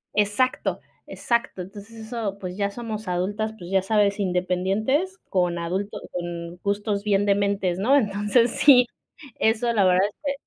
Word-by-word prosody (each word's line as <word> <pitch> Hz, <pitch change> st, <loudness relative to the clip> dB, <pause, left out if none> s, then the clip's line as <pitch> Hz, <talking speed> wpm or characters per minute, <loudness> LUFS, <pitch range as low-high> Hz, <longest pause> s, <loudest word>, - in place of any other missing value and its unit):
Exacto, 210 Hz, +5 st, +1 dB, 0.3 s
exacto. 235 Hz, -5 st, -1 dB
Entonces, 210 Hz, +4 st, -11 dB
eso, 220 Hz, -4 st, -3 dB
pues, 185 Hz, -2 st, -6 dB
ya 200 Hz, 0 st, 0 dB
somos 215 Hz, -1 st, -6 dB
adultas, 205 Hz, +5 st, -2 dB
pues, 175 Hz, -1 st, -9 dB
ya 190 Hz, -1 st, +3 dB
sabes 205 Hz, 0 st, +1 dB
independientes 195 Hz, -, 0 dB
con 180 Hz, -2 st, +1 dB
adulto 185 Hz, +5 st, -3 dB
con 175 Hz, -1 st, -5 dB
gustos 200 Hz, 0 st, -1 dB
bien 205 Hz, -1 st, +2 dB
dementes, 200 Hz, -3 st, +1 dB
¿no? 250 Hz, +8 st, +4 dB
Entonces, 210 Hz, +1 st, +2 dB
sí, 250 Hz, -4 st, +6 dB, 0.5 s
eso 230 Hz, +2 st, +2 dB
la 205 Hz, -4 st, +3 dB
verdad 185 Hz, +1 st, +4 dB
es 205 Hz, -, -12 dB
que 280 Hz, -1 st, 0 dB
205 Hz, 150 wpm, -24 LUFS, 185-220 Hz, 0.5 s, sí